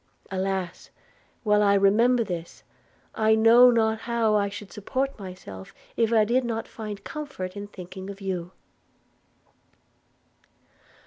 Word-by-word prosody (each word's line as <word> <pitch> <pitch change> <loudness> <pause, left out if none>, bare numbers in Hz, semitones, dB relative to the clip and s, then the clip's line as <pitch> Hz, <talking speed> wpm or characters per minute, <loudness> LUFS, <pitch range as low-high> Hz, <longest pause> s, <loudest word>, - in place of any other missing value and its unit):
Alas! 190 -2 -3 0.5
while 210 -2 +3
I 200 -1 +4
remember 230 +5 +4
this, 175 -5 -7 0.5
I 220 0 +3
know 230 +3 +7
not 220 -2 +2
how 230 -2 0
I 200 -1 +2
should 205 0 -9
support 260 +5 -3
myself 180 - -10 0.2
if 230 -1 +1
I 220 -2 +4
did 250 +4 +2
not 225 -2 -3
find 210 -3 -7
comfort 280 -12 -6
in 205 0 -6
thinking 190 0 -9
of 200 0 -8
you.' 185 -3 -4
210 Hz, 125 wpm, -25 LUFS, 190-230 Hz, 0.5 s, know